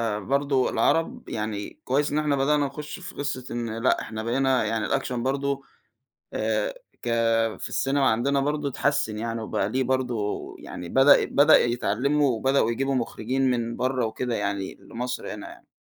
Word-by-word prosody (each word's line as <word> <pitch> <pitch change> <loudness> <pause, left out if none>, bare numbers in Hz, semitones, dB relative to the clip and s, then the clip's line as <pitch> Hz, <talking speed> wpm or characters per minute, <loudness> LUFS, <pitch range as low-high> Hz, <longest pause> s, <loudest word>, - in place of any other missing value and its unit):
آآ - - -3
برضو 140 +3 +1
العرب 240 +10 0
يعني، 105 -2 -4
كويِس 145 +3 +1
إن 150 - +1
إحنا 150 -2 +1
بدأنا 145 +1 +2
نخُش 150 +2 -6
في - - -9
قصة 140 -3 -3
إن 115 -2 -3
لأ، - - +3
إحنا 110 0 -5
بقينا 130 +1 +2
يعني، 110 0 -1
الaction - - -1
برضو 135 +3 -1 0.7
آآ، - - 0 0.3
ك 120 - -3 0.5
في - - -5
السينما 135 0 +2
عندنا 135 +5 +1
برضه 145 0 0
اتحسن 140 -5 0
يعني، 115 0 -3
وبقى 105 -2 -1
ليه 130 +3 0
برضو 125 -5 -1 0.2
يعني، 85 - -8
بدأ 135 +2 +6
بدأ 145 +3 +6
يتعلَّموا 130 +5 +1
وبدأوا 130 -1 +2
يجيبوا 135 +3 0
مخرِّجين 130 +2 0
من 115 -1 -1
برّه 130 -1 0
وكده 115 +2 -2
يعني، 100 -2 -2
لمصر 125 +5 -5
هنا - - -8
يعني - - -15
130 Hz, 165 wpm, -25 LUFS, 115-140 Hz, 0.7 s, بدأ